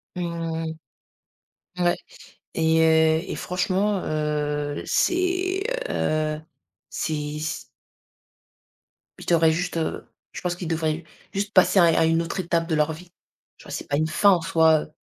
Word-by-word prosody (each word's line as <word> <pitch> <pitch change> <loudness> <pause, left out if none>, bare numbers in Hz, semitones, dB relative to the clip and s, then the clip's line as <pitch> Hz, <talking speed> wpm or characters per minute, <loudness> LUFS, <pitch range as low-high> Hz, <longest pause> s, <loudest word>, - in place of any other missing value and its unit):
Mmh. 165 -2 -3 1.1
Ouais. 175 -1 +2 0.6
Et 160 0 +2
heu, 160 0 +4
et - - -3
franchement, 190 +2 0
heu. 150 -1 -2
C'est, 370 +2 +1 0.3
heu 155 0 0 0.5
c'est 150 -1 -3
c 155 +1 -4 1.5
Je - - -10
t'aurait 165 -2 +4
juste, 175 +1 -2
heu 160 - -3 0.3
je - - -7
pense 175 -1 -1
qu'ils 175 -2 -6
devraient 160 0 -1 0.3
juste 205 +2 -2
passer 190 - +5
à - - +7
un 165 - +5
à - - +3
une 165 +1 +2
autre 170 +3 -5
étape 170 -1 0
de 160 - 0
leur 155 +1 +2
vie. 175 +3 -12 0.5
Tu - - -16
vois? - - -9
C'est - - -5
pas 145 - 0
une 155 +1 +1
fin 200 +5 +4
en 180 -3 +4
soi, 160 -1 +4
heu, - - -11
165 Hz, 155 wpm, -24 LUFS, 155-180 Hz, 1.5 s, à